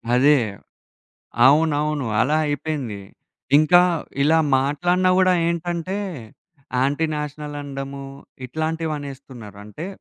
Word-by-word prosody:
అదే. 145 Hz, +3 st, +5 dB, 1.1 s
అవునవును. 150 Hz, -1 st, +2 dB
అలా 145 Hz, +6 st, +2 dB
అయిపోయింది. 145 Hz, -8 st, -3 dB, 0.6 s
ఇంకా 175 Hz, +4 st, +6 dB, 0.4 s
ఇలా 160 Hz, +3 st, +4 dB, 0.2 s
మాట్లాడినా 175 Hz, +7 st, +1 dB
గూడా 185 Hz, 0 st, +4 dB
ఏంటంటే 170 Hz, +2 st, -2 dB, 0.8 s
యాంటీ 145 Hz, +4 st, +1 dB
నేషనల్ 150 Hz, 0 st, -5 dB
అనడము, 140 Hz, -1 st, -6 dB, 0.4 s
ఇట్లాంటివనేస్తున్నారు. 140 Hz, -7 st, -5 dB
అంటే 105 Hz, -, -8 dB
150 Hz, 85 wpm, -22 LUFS, 135-160 Hz, 1.1 s, ఇంకా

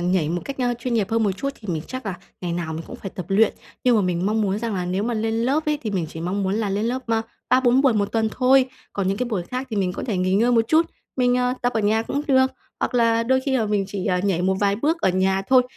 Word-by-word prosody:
nhảy 175 Hz, -3 st, +1 dB
một 175 Hz, +2 st, -2 dB
cách, 275 Hz, -1 st, -6 dB
ơ, 245 Hz, -1 st, +1 dB
chuyên 245 Hz, 0 st, -2 dB
nghiệp 210 Hz, -4 st, +2 dB
hơn 225 Hz, 0 st, +2 dB
một 205 Hz, -, +2 dB
chút 200 Hz, +9 st, -3 dB
thì 210 Hz, -, -11 dB
mình 160 Hz, -3 st, -1 dB
chắc 255 Hz, -4 st, -6 dB
là 190 Hz, -, -2 dB, 0.3 s
ngày 175 Hz, -2 st, -3 dB
nào 170 Hz, -2 st, -3 dB
mình 160 Hz, +1 st, -5 dB
cũng -, -, -8 dB
phải 195 Hz, -, -7 dB
tập 180 Hz, -, -6 dB
luyện. 205 Hz, +2 st, +3 dB, 0.3 s
Nhưng 245 Hz, -2 st, +5 dB
mà 210 Hz, -, +3 dB
mình 180 Hz, 0 st, 0 dB
mong 215 Hz, +1 st, +1 dB
muốn 200 Hz, 0 st, 0 dB
rằng 225 Hz, -2 st, -3 dB
là 180 Hz, -, -2 dB
nếu 185 Hz, +3 st, -1 dB
mà 235 Hz, +2 st, -1 dB
lên 225 Hz, 0 st, -1 dB
lớp 265 Hz, +7 st, 0 dB
ấy, 300 Hz, -1 st, +1 dB
thì 220 Hz, -, -2 dB
mình 180 Hz, -5 st, -1 dB
chỉ 160 Hz, -, -8 dB
mong 185 Hz, +4 st, -2 dB
muốn 190 Hz, +1 st, 0 dB
là 215 Hz, -2 st, -1 dB
lên 205 Hz, +2 st, -1 dB
lớp, 255 Hz, +2 st, -2 dB
ơ, 225 Hz, -1 st, +1 dB, 0.3 s
3-4 255 Hz, 0 st, +4 dB
buổi 270 Hz, -4 st, +5 dB
một 205 Hz, -1 st, 0 dB
tuần 225 Hz, -1 st, +1 dB
thôi, 260 Hz, 0 st, +4 dB, 0.3 s
còn 195 Hz, -2 st, -1 dB
những 195 Hz, -, 0 dB
cái 250 Hz, +3 st, -2 dB
buổi 205 Hz, -7 st, -1 dB
khác 255 Hz, +8 st, -5 dB
thì 220 Hz, -, -3 dB
mình 185 Hz, -2 st, 0 dB
có -, -, -5 dB
thể 215 Hz, -, -1 dB
nghỉ 185 Hz, +1 st, +1 dB
ngơi 235 Hz, +5 st, +3 dB
một 230 Hz, -1 st, +4 dB
chút, 320 Hz, +1 st, +4 dB, 0.3 s
mình, 250 Hz, -1 st, +3 dB
ờ, 250 Hz, 0 st, +1 dB
tập 245 Hz, -, +1 dB
ở 225 Hz, -, 0 dB
nhà 215 Hz, +2 st, +2 dB
cũng 280 Hz, +5 st, -2 dB
được. 260 Hz, -1 st, +5 dB, 0.3 s
Hoặc -, -, -1 dB
là 230 Hz, -1 st, +3 dB
đôi 260 Hz, +3 st, +2 dB
khi 265 Hz, 0 st, 0 dB
là 225 Hz, -, +1 dB
mình 205 Hz, -1 st, +1 dB
chỉ, 195 Hz, -2 st, -4 dB
à, 180 Hz, 0 st, +1 dB
nhảy 180 Hz, -3 st, +1 dB
một 190 Hz, +1 st, +2 dB
vài 200 Hz, -1 st, +2 dB
bước 315 Hz, +8 st, 0 dB
ở -, -, +3 dB
nhà 190 Hz, +1 st, +1 dB
thôi, 255 Hz, -1 st, +6 dB
220 Hz, 310 wpm, -23 LUFS, 190-250 Hz, 0.3 s, thôi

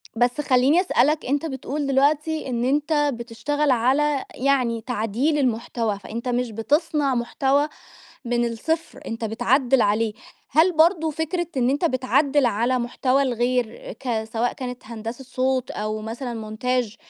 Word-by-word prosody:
بس 245 Hz, +5 st, +1 dB
خلّيني 275 Hz, +5 st, +4 dB
أسألك 310 Hz, -4 st, +2 dB
أنت 285 Hz, +4 st, 0 dB
بتقول 280 Hz, 0 st, -3 dB
دلوقتي 295 Hz, +3 st, +1 dB
إن 240 Hz, -1 st, -1 dB
أنت 295 Hz, +4 st, +1 dB, 0.2 s
بتشتغل 255 Hz, +5 st, -1 dB
على 270 Hz, +4 st, +2 dB
يعني 250 Hz, -4 st, +1 dB
تعديل 240 Hz, +6 st, 0 dB
المحتوى، 230 Hz, -5 st, -1 dB
فأنت 230 Hz, +5 st, -6 dB
مش 245 Hz, -1 st, -1 dB
بتصنع 280 Hz, -, +1 dB
محتوى 270 Hz, +4 st, +1 dB, 0.6 s
من 240 Hz, 0 st, +1 dB
الصفر 310 Hz, +8 st, -3 dB
أنت 225 Hz, 0 st, -4 dB
بتعدّل 245 Hz, +3 st, +2 dB
عليه، 215 Hz, +1 st, +1 dB, 0.4 s
هل 320 Hz, +6 st, +4 dB
برضه 325 Hz, 0 st, +4 dB
فكرة 320 Hz, +3 st, -2 dB
إن 250 Hz, -1 st, +2 dB
أنت 285 Hz, +6 st, +1 dB
بتعدّل 275 Hz, 0 st, +2 dB
على 240 Hz, +3 st, +1 dB
محتوى 255 Hz, +3 st, +1 dB
الغير 245 Hz, -2 st, -1 dB
ك 235 Hz, -4 st, -2 dB
سواء 225 Hz, +2 st, -1 dB
كانت 250 Hz, -1 st, -7 dB
هندسة 230 Hz, +2 st, -7 dB
صوت، 260 Hz, 0 st, -1 dB
أو 215 Hz, +1 st, -3 dB
مثلًا 225 Hz, -1 st, -6 dB
montage، 250 Hz, -2 st, 0 dB
255 Hz, 135 wpm, -23 LUFS, 235-290 Hz, 0.6 s, خلّيني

